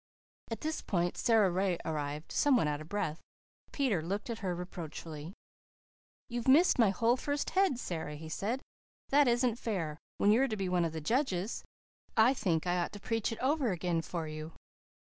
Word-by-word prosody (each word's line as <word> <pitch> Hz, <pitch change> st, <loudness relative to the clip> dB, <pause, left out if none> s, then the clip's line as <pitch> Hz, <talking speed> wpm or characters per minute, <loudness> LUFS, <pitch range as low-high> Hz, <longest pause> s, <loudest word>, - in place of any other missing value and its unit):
At 225 Hz, -, -4 dB
this 315 Hz, 0 st, -2 dB
point 175 Hz, -2 st, 0 dB
Sara 220 Hz, -5 st, +4 dB
Ray 185 Hz, 0 st, +1 dB
arrived, 150 Hz, 0 st, -3 dB
somewhat 265 Hz, -, +4 dB
out 150 Hz, 0 st, -1 dB
of 155 Hz, -, -10 dB
breath. 185 Hz, -6 st, -2 dB, 0.5 s
Peter 250 Hz, -, +1 dB
looked 200 Hz, +8 st, -3 dB
at 230 Hz, -, -4 dB
her 185 Hz, -3 st, -2 dB
reproachfully. 165 Hz, -1 st, -7 dB, 0.9 s
"You've 240 Hz, 0 st, -4 dB
missed 295 Hz, +3 st, +6 dB
my 225 Hz, -4 st, +6 dB
whole 230 Hz, +5 st, +3 dB
first 285 Hz, +2 st, -2 dB
head, 380 Hz, -9 st, +3 dB
Sara," 160 Hz, -9 st, -4 dB
he 160 Hz, +2 st, -8 dB
said, 220 Hz, +10 st, -2 dB, 0.5 s
"that 285 Hz, 0 st, +5 dB
isn't 240 Hz, -1 st, +2 dB
fair, 165 Hz, -11 st, -2 dB, 0.2 s
when 205 Hz, -, +4 dB
you're 255 Hz, +5 st, +4 dB
to 220 Hz, -4 st, -3 dB
be 190 Hz, -2 st, -1 dB
one 180 Hz, -1 st, +2 dB
of 160 Hz, -, -3 dB
the 160 Hz, -, -4 dB
judges. 220 Hz, -, 0 dB, 0.5 s
I 230 Hz, +4 st, +6 dB
think 180 Hz, -10 st, 0 dB
I 180 Hz, 0 st, +1 dB
ought 175 Hz, -, -2 dB
to 205 Hz, -, -7 dB
preach 225 Hz, +2 st, -1 dB
it 225 Hz, -, -4 dB
over 270 Hz, -3 st, +2 dB
again 175 Hz, -2 st, 0 dB
for 165 Hz, -1 st, -4 dB
you." 155 Hz, +1 st, -6 dB
195 Hz, 180 wpm, -32 LUFS, 165-240 Hz, 0.9 s, missed